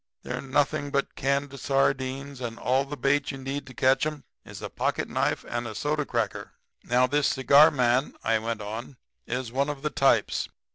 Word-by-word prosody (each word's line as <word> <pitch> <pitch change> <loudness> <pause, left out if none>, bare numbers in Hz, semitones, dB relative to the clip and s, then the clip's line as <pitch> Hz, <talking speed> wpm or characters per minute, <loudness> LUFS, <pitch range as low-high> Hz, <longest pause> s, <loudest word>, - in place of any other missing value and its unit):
They're - - -4
nothing 145 +2 0
but 140 0 -1
canned 140 0 -1
sardines, 135 0 0
and 115 -2 -4
all 130 +3 +1
the 145 +1 -6
bait 140 +2 +1
you 135 - -4
need 135 +1 -5
to 130 - -11
catch 130 +2 +3
'em 150 -2 -3 0.2
is - - -10
a - - -2
pocketknife - - -1
and 120 0 -3
a 110 - -7
soda 150 0 -1
cracker. - - -2 0.3
"'Now, 125 +1 +3
this 145 +2 +2
cigar 140 +3 +6
man,' 130 -2 +1
I 110 0 +2
went 115 0 -3
on, 115 +5 -6 0.3
'is 125 -1 -3
one 140 +3 0
of 145 -1 -5
the 150 - -1
types. 135 0 +2
135 Hz, 185 wpm, -27 LUFS, 125-140 Hz, 0.3 s, cigar